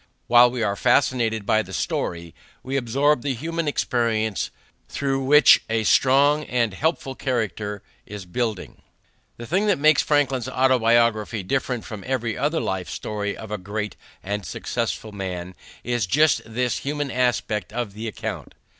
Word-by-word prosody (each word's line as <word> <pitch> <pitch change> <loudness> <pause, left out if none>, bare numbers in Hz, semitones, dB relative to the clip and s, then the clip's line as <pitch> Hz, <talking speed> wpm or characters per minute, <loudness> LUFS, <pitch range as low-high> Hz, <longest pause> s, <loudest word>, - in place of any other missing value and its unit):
While 120 0 +6
we 120 -1 -3
are 100 -2 0
fascinated 115 -4 +1
by 110 +2 +3
the 95 -2 -10
story, 85 -1 -3 0.3
we 135 +1 -4
absorb 135 +2 +2
the 140 -1 -2
human 165 +5 -3
experience 115 -6 0 0.4
through 135 -1 -1
which 150 +2 +7
a 110 0 0
strong 140 +6 +4
and 120 -4 0
helpful 145 - -1
character 110 -6 -3 0.2
is 105 -3 -8
building. 110 +2 -4 0.6
The 120 - -8
thing 190 - 0
that 205 - +3
makes 155 +2 +5
Franklin's 135 -5 +1
Autobiography 115 -4 +2
different 125 +2 -2
from 105 -3 -8
every 120 -4 -1
other 155 +3 0
life 95 -2 -3
story 105 -1 -4
of 110 - -9
a 105 - -3
great 105 +3 -4 0.3
and 100 +1 -3
successful 110 +5 -3
man 90 -3 -5 0.3
is 120 -4 -1
just 150 +7 +3
this 125 +2 -1
human 145 -1 -3
aspect 120 -5 0
of 115 -3 -4
the 110 +2 -6
account. 110 - -6
120 Hz, 150 wpm, -23 LUFS, 105-135 Hz, 0.6 s, which